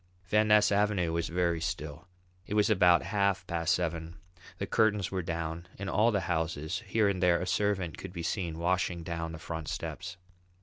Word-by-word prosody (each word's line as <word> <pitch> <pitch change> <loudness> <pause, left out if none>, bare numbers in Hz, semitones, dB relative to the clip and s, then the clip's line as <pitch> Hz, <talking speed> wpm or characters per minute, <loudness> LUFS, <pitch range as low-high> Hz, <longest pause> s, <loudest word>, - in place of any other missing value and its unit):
Van 105 +1 +3
Ness 105 -1 +5
Avenue 100 -5 +2
was 85 0 -1
very 85 -1 0
still. 80 0 -4 0.4
It 105 - -3
was 105 +1 +3
about 90 -4 +5
half 100 -3 0
past 85 -1 +1
seven. 85 -1 -3 0.4
The - - -2
curtains 105 -5 +2
were 95 -1 -1
down 85 0 -4
in 100 0 -4
all 110 +2 +3
the 100 -4 +1
houses; 80 0 -2
here 110 -2 +2
and 95 -2 -1
there 90 -1 +4
a 90 - -2
servant 95 -3 0
could 95 - -7
be 85 -2 -6
seen 85 -3 -2
washing 90 0 0
down 85 0 -4
the 80 - -7
front 80 -1 -6
steps. 85 +1 -5
90 Hz, 185 wpm, -30 LUFS, 85-100 Hz, 0.4 s, Ness